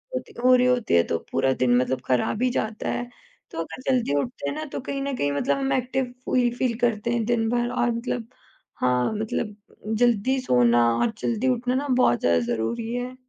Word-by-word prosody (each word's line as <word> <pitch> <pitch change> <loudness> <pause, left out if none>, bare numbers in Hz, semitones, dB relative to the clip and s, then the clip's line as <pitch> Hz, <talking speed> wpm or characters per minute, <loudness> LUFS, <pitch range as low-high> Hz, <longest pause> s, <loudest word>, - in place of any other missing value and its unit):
होती - - -5
हो 255 0 +7
रही 250 0 +3
होती 250 -3 +1
है 85 - +5
तो 85 - 0
पूरा 135 0 +2
दिन 125 -1 +4
मतलब 130 0 0
खराब 130 - 0
ही 255 - +3
जाता 220 0 -3
है, 245 0 -3 0.4
तो - - -9
अगर 165 +8 -6
जल्दी 245 - +1
उठते 245 - -4
हैं - - -4
ना 310 0 -4
तो - - -2
कहीं 275 +1 -4
न 275 -1 -2
कहीं 145 0 0
मतलब 145 - 0
हम 270 0 -1
एक्टिव 255 0 -1
फ़ी 245 -1 +2
फ़ील 245 -3 -1
करते 235 -1 0
हैं 235 -2 0
दिन 230 -1 +1
भर 240 0 0
और 240 -1 +1
मतलब 235 0 -3 0.5
हाँ, 125 - +1
मतलब 215 0 -3 0.4
जल्दी 245 +2 +2
सोना 120 - +4
और 230 - +1
जल्दी 235 +2 -1
उठना 250 0 0
ना 285 +2 -1
बहुत 250 - +3
ज़्यादा 85 0 +3
ज़रूरी 225 - -2
है। 250 +1 -4
235 Hz, 210 wpm, -24 LUFS, 160-250 Hz, 0.5 s, हो